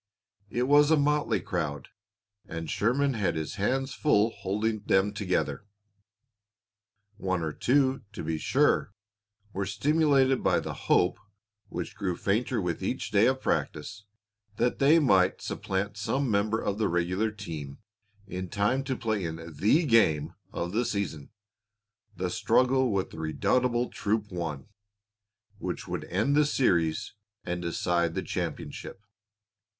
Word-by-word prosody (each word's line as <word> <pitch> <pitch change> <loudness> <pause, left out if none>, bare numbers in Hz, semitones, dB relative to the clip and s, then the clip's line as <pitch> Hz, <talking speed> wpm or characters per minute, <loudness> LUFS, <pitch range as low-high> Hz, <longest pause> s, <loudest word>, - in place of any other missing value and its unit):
It 120 +3 0
was 145 +3 +5
a 160 - +5
motley 145 - +1
crowd, 80 -7 -3 0.6
and 80 0 -5
Sherman 125 +8 +1
had 100 -8 0
his 80 +5 -4
hands 135 +5 0
full 115 -7 +3
holding 110 +2 -2
them 100 0 +2
together. 105 0 -2 1.5
One 95 -4 -1
or 80 -1 -2
two, 135 - +2
to - - -6
be 80 0 -2
sure, 100 - +2 0.6
were 95 0 -2
stimulated 140 -3 +3
by - - +3
the - - -5
hope, 90 - +2 0.5
which - - -5
grew 95 -5 -2
fainter 115 +4 0
with 90 -4 -2
each - - -2
day - - +5
of - - +1
practice, 100 +7 -2 0.5
that 120 +3 0
they 145 +4 +6
might 95 - +3
supplant 100 +2 -3
some 130 +4 -1
member 105 +2 +1
of 100 -1 -2
the 110 - +2
regular 90 +5 0
team 80 -10 -7 0.5
in 95 -2 -5
time 105 +8 +1
to 130 -2 -2
play 110 -5 -1
in 80 -1 -3 0.2
the 115 - +3
game 110 - +3 0.2
of 85 +1 -3
the 115 +5 +1
season, 90 - -3 0.9
the 90 -1 -2
struggle 130 +5 +2
with 95 -2 -1
the 80 - -9
redoubtable 120 +10 +1
Troop 105 0 -1
One, 80 -6 -4 0.9
which - - -4
would - - -4
end 110 +11 +1
the 150 -1 +4
series 85 - +1 0.3
and 90 0 -3
decide 85 -1 0
the - - -2
championship. 100 - -5
105 Hz, 140 wpm, -28 LUFS, 90-125 Hz, 1.5 s, they